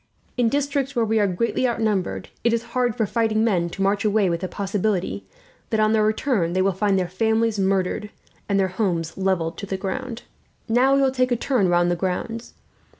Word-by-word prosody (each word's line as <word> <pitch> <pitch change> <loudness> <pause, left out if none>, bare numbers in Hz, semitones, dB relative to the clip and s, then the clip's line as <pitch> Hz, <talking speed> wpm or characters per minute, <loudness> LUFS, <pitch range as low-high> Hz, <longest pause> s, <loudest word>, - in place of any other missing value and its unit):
In 245 -2 +2
districts 280 0 -1
where 235 -2 +2
we 220 0 +1
are 205 - +3
greatly 230 +7 0
outnumbered, 215 -6 -1
it 235 - +3
is 230 0 0
hard 245 -3 +1
for 220 - +1
fighting 220 0 +1
men 180 -7 +1
to 195 - -3
march 200 +1 +1
away 210 -3 +2
with 170 - -1
the 185 - -3
possibility 200 +1 -2 0.4
that, 220 - 0
on 215 0 +3
their 215 -1 +3
return, 215 -5 +1
they 185 - +2
will 195 - +3
find 195 +1 +1
their 185 -1 0
families 220 +3 +1
murdered 195 +1 0 0.4
and 200 -1 +2
their 190 -1 +2
homes 175 -5 -1
levelled. 180 -4 -1 1.1
"Now 250 +4 +4
we 275 - +3
will 265 - +3
take 255 -1 0
a - - +4
turn 240 -4 +1
round 175 0 +3
the - - +1
grounds. 190 +6 -4
210 Hz, 195 wpm, -23 LUFS, 185-230 Hz, 1.1 s, Now